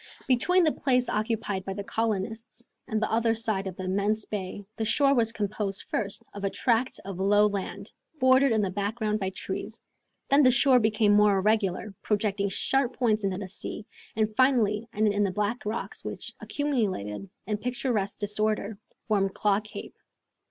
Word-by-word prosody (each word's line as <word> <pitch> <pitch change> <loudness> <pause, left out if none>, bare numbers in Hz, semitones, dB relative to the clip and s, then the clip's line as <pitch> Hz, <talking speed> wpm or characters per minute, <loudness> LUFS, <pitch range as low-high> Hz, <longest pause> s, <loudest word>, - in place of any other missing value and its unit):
Between 355 +9 +4
the 315 - +4
place 250 -3 +1
occupied 215 -3 -1
by 195 - -4
the 200 - -4
colonists 220 +2 -3 0.2
and 220 - 0
the 215 - -1
other 225 0 +2
side 220 -4 -1
of 185 - -5
the 185 - -6
immense 200 +3 0
bay, 200 -1 -5
the 225 - -1
shore 275 +6 +3
was 230 -4 +2
composed, 205 -2 -3
first, 200 -3 -3
of 200 - -8
a 195 - +1
tract 240 +4 0
of 195 -2 -6
low 205 +2 +4
land, 200 -2 -3 0.3
bordered 260 0 +5
in 220 -2 +2
the 190 - -1
background 210 +2 -1
by 190 -2 -1
trees; 190 - -6 0.5
then 280 +1 +7
the 255 - +6
shore 255 +1 +5
became 215 -1 +3
more 210 -1 +5
irregular, 205 0 0
projecting 205 -1 0
sharp 265 +6 +1
points 220 -4 +2
into 195 -2 0
the 200 -1 -5
sea, 200 +2 -7 0.3
and 215 0 0
finally 230 -4 +3
ended 210 -1 +2
in 205 0 +2
the 200 - +1
black 210 +5 -2
rocks 215 - -4
which, - - -6
accumulated 200 - -2 0.2
in 210 -1 -1
picturesque 245 -4 -1
disorder, 210 0 -1 0.2
formed 195 -3 0
Claw 205 -1 +2
Cape. 215 0 -9
215 Hz, 175 wpm, -27 LUFS, 200-230 Hz, 0.5 s, then